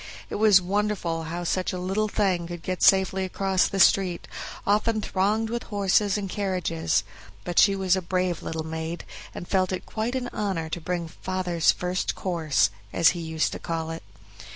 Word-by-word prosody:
It - - -2
was 205 -3 +6
wonderful 185 -4 -1
how 170 +2 -4
such 185 +2 0
a - - -3
little 195 +4 0
thing 190 -5 0
could 175 -1 -7
get 185 -1 -3
safely 190 0 +4
across 190 0 +1
the 195 - -3
street, 185 -3 +3 0.4
often 215 +2 +2
thronged 210 +3 0
with 235 0 -2
horses 200 0 +2
and 200 -1 -3
carriages; 180 - -1 0.4
but 175 - +1
she 200 -1 +6
was 190 -1 +2
a 190 - -1
brave 180 -1 -1
little 160 -1 -4
maid, 160 +1 -5 0.3
and 175 - -7
felt 185 -1 +1
it 185 - -4
quite 225 +3 -3
an 250 -1 -2
honor 185 -6 -2
to 170 - -4
bring 175 0 -2
"father's 180 0 0
first 180 +1 -2
course", 160 - +1 0.2
as 170 - +5
he 175 - -3
used 160 -1 -1
to - - -6
call 165 -1 -3
it. 165 - -6
185 Hz, 180 wpm, -26 LUFS, 170-200 Hz, 0.4 s, was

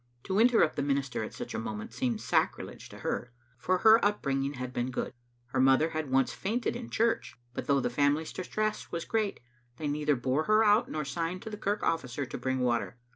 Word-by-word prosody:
To 190 +2 0
interrupt 230 -8 +4
the - - +1
minister 140 -4 -1
at - - -5
such - - -6
a - - -2
moment 110 0 -5
seemed 125 -3 -1
sacrilege - - -1
to - - -11
her, 120 - -2 0.3
for 185 +7 +1
her 220 +4 +6
up 205 +1 +1
bringing 135 0 0
had 125 0 -5
been 120 +1 -1
good. 125 - -3 0.4
Her - - -1
mother 135 +4 +5
had 155 -3 -3
once 135 0 +2
fainted 230 +5 -1
in 240 0 -5
the - - -12
church, 220 - 0 0.2
but - - -5
though 140 -1 +4
the 125 - -1
family's 145 +4 +1
distress 215 +3 -2
was 170 -1 -3
great, 215 -3 -1 0.4
they 150 - -3
neither 150 0 +1
bore 130 +5 0
her 215 +1 +5
out, 210 +2 +4
nor 155 -1 -3
signed 165 +6 -3
to 220 - -6
the - - -4
kirk 205 0 -1
officer 140 -4 -1
to - - -6
bring 130 0 -1
water. 120 0 0
145 Hz, 220 wpm, -30 LUFS, 130-200 Hz, 0.4 s, her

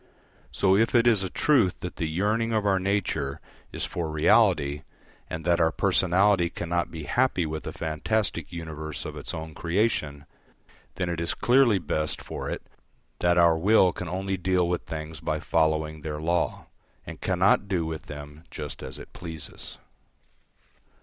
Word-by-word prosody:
So, 95 -1 +3
if 115 +4 +2
it 120 0 +5
is 115 -5 +4
a 95 - -2
truth 130 -9 +2
that 90 - -6
the 80 - -1
yearning 105 +7 0
of 110 -2 +1
our 95 -2 +3
nature 95 -8 -1 0.3
is - - -3
for 85 -2 -3
reality, 75 -2 +3 0.5
and 80 0 -5
that 85 -1 +3
our 80 -1 +3
personality 95 +2 +3
cannot 85 0 -2
be 80 -2 -7
happy 120 - +1
with 80 0 -5
a - - -3
fantastic 85 +1 -1
universe 80 -3 -5
of - - -6
its - - -5
own 80 -1 -6
creation, 85 -5 -1 0.7
then 90 - -2
it 85 -1 -2
is 85 - -1
clearly 120 -4 +4
best 75 -2 -2
for - - -6
it - - -4 0.6
that 85 0 +3
our 85 -1 +5
will 95 -1 +5
can 90 - -6
only 95 +1 -2
deal 90 -1 +1
with 90 -1 -2
things 80 0 -6
by - - -2
following 80 -1 0
their 75 0 -4
law, 85 +3 -1 0.4
and - - -9
cannot 95 +2 +3
do 90 -5 0
with 80 -1 -5
them 75 +1 -9
just 75 -1 -6
as 65 0 -6
it - - -12
pleases. 80 -3 -8
85 Hz, 165 wpm, -26 LUFS, 80-95 Hz, 0.7 s, it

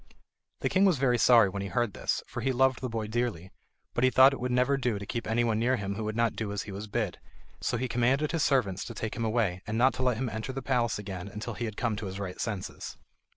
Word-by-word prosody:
The - - +1
king 190 0 +3
was 185 -6 +4
very 125 -2 +2
sorry 115 -4 +6
when 100 +1 -4
he 100 - -3
heard 120 -1 0
this, - - -2
for - - -6
he 135 - +1
loved 130 0 +2
the 130 - -2
boy 115 -1 -3
dearly; 110 -5 -2 0.4
but 120 - 0
he 130 - +6
thought 130 +1 +7
it - - -5
would 125 +1 -2
never 125 +3 +3
do 125 -5 -1
to 100 - -6
keep 115 +3 -4
anyone 115 -1 +1
near 125 +3 +2
him 100 -4 -3
who 110 +2 -4
would 110 0 -3
not 115 -1 +1
do 110 -2 -3
as 100 -1 -3
he 105 - -8
was 100 +2 -6
bid. 105 -3 -2 0.4
So 120 - -1
he 130 +2 -1
commanded 130 +5 +1
his 165 - 0
servants 125 -10 +1
to 115 - -7
take 110 +1 -4
him 115 - -3
away 110 -5 0
and 105 +1 -2
not 130 +3 +4
to - - -5
let 125 -3 +2
him 130 +2 -1
enter 110 +4 -4
the 135 - -5
palace 120 -4 +1
again 95 -2 -6
until 105 +3 -6
he 120 - -4
had 110 -2 -6
come 115 -3 0
to 100 - -4
his 95 +1 -6
right 95 -2 -5
senses. 105 -5 -5
115 Hz, 275 wpm, -29 LUFS, 105-125 Hz, 0.4 s, thought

